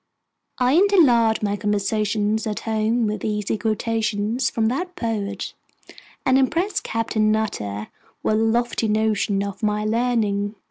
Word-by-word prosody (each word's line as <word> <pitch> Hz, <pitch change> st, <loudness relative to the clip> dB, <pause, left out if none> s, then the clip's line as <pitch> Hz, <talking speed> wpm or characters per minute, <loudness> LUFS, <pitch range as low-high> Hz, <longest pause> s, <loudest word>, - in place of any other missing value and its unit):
I 250 Hz, +1 st, +2 dB
interlard 250 Hz, -, +4 dB
my 205 Hz, -1 st, 0 dB
conversation 210 Hz, +1 st, 0 dB
at 210 Hz, -, -3 dB
home 225 Hz, +1 st, 0 dB
with 215 Hz, 0 st, -3 dB
easy 210 Hz, -1 st, -1 dB
quotations 225 Hz, +1 st, -1 dB
from 225 Hz, -, -1 dB
that 355 Hz, +8 st, -3 dB
poet, 210 Hz, -, -3 dB, 0.7 s
and 260 Hz, -1 st, +4 dB
impress 335 Hz, +9 st, +1 dB
Captain 220 Hz, -1 st, 0 dB
Nutter 105 Hz, -, -2 dB, 0.3 s
with -, -, +1 dB
a -, -, +2 dB
lofty 225 Hz, +1 st, +1 dB
notion 215 Hz, -2 st, +1 dB
of 200 Hz, 0 st, -6 dB
my 210 Hz, 0 st, 0 dB
learning. 215 Hz, -3 st, 0 dB
220 Hz, 130 wpm, -22 LUFS, 210-235 Hz, 0.7 s, interlard